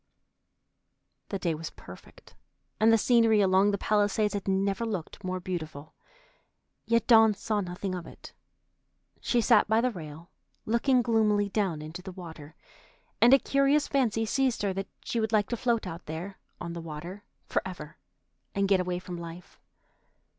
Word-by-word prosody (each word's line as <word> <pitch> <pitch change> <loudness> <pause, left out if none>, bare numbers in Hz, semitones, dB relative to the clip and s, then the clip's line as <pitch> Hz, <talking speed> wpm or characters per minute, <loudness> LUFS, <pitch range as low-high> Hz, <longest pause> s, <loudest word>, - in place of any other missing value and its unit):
The 200 - -2
day 170 -3 -1
was 160 +1 -6
perfect, - - -15 0.5
and 220 +1 +5
the 225 - +6
scenery 225 -1 +4
along 190 0 +4
the 200 - 0
Palisades 210 +1 +1
had 200 -1 -4
never 195 +3 0
looked 205 -3 -5
more 185 0 -3
beautiful, 160 -5 -6 0.9
yet 230 -1 +2
Dawn 225 -3 +6
saw 205 +1 -1
nothing 185 +1 -4
of 180 -2 -6
it. - - -13 0.9
She 240 - +1
sat 225 -2 +4
by 220 +1 +3
the 250 +2 +1
rail 160 -3 -10 0.3
looking 245 +3 +2
gloomily 210 -3 +2
down 190 -7 -1
into 160 +4 -8
the 190 0 -8
water, 160 -4 -10 0.7
and 240 - +7
a 270 - +9
curious 275 +2 +2
fancy 225 -5 +1
seized 255 0 0
her 200 -2 0
that 195 +1 -4 0.2
she 235 - -1
would 220 -1 -1
like 210 -2 +2
to 240 - -1
float 235 -2 0
out 170 -1 -8
there 175 +5 -6 0.2
on 170 -1 -5
the 170 - -6
water 165 +5 -8 0.2
forever 175 -5 -4 0.6
and 200 0 +1
get 195 -1 +4
away 180 -1 -1
from 180 -1 -7
life. 170 +1 -10
200 Hz, 160 wpm, -28 LUFS, 175-225 Hz, 0.9 s, a